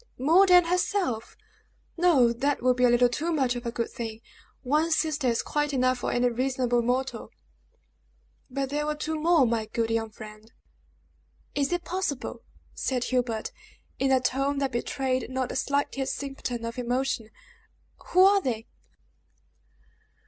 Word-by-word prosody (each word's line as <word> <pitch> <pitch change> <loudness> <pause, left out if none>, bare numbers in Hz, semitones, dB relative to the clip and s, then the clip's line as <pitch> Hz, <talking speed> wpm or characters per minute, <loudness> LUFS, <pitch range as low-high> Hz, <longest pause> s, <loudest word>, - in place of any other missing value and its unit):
"More 330 +9 +5
than 360 -1 +7
herself! 355 - -1 0.6
No. 305 -9 +4
That 275 +2 -1
would 255 0 +4
be 250 0 +3
a - - +5
little 240 +1 +5
too 305 +8 -2
much 265 -6 +1
of 240 0 -5
a - - -2
good 235 0 -3
thing! 225 -1 -6 0.4
One 300 +5 +1
sister 310 -4 0
is 235 -1 +1
quite 295 -1 -1
enough 255 -1 +2
for - - -2
any 245 0 +2
reasonable 250 0 0
mortal." 255 +3 -2 1.2
"But 270 +1 -3
there 295 +1 -1
were 300 - -1
two 310 +1 -3
more, 325 -3 +4
my 225 -2 -1
good 225 +1 -2
young 225 -1 -1
friend!" 215 +1 -12 1.0
"Is 280 +1 0
it 350 0 -1
possible?" 345 -6 -3 0.3
said 255 -2 -1
Hubert, 245 -4 -1 0.5
in 270 0 +2
a 260 - +5
tone 275 +3 0
that 275 -1 -1
betrayed 255 +1 -2
not 260 -1 -2
the - - -5
slightest 275 0 -1
symptom 265 -4 -5
of 230 +2 -5
emotion. 245 -2 -1 0.8
"Who 370 +1 +5
are 400 0 +5
they?" 230 -8 -3
260 Hz, 155 wpm, -27 LUFS, 240-295 Hz, 1.2 s, than